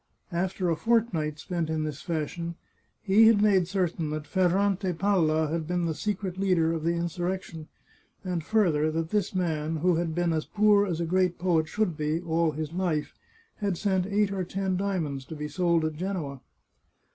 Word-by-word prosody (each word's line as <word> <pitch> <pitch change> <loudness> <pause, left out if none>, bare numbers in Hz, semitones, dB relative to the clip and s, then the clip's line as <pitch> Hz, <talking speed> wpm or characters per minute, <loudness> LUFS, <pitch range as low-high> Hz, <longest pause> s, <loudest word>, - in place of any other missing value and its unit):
After 180 +1 -1
a 165 - +2
fortnight 165 -6 +1
spent 165 0 -3
in 160 -1 -1
this 150 -2 -4
fashion, 170 +1 -3 0.5
he 215 +2 +6
had 225 -2 +5
made 195 -4 +4
certain 175 -5 -1
that 155 0 -4
Ferrante 190 +1 +1
Palla 160 -4 +2
had 160 -1 -2
been 175 0 0
the 165 - 0
secret 190 0 -3
leader 175 -4 +2
of 160 -2 -3
the 170 +1 +1
insurrection, 175 -1 -3 0.6
and 180 -3 -2
further, 160 -7 +2
that 160 +1 -2
this 205 -2 0
man, 160 -3 -1
who 170 +2 +2
had 165 -2 -2
been 175 -1 +1
as 155 -1 -1
poor 210 -1 +4
as 170 -3 -2
a 170 - 0
great 180 +1 +1
poet 165 -3 +1
should 195 -2 -1
be, 155 +1 0
all 165 -1 +1
his 155 +1 -4
life, 175 -5 -1 0.4
had 200 -4 -1
sent 190 -2 0
eight 205 0 +1
or 190 -1 -1
ten 190 +1 -2
diamonds 175 -8 -2
to 160 - -8
be 150 0 -4
sold 170 -1 +1
at 155 - -1
Genoa. 155 -6 -4
175 Hz, 180 wpm, -27 LUFS, 160-190 Hz, 0.6 s, he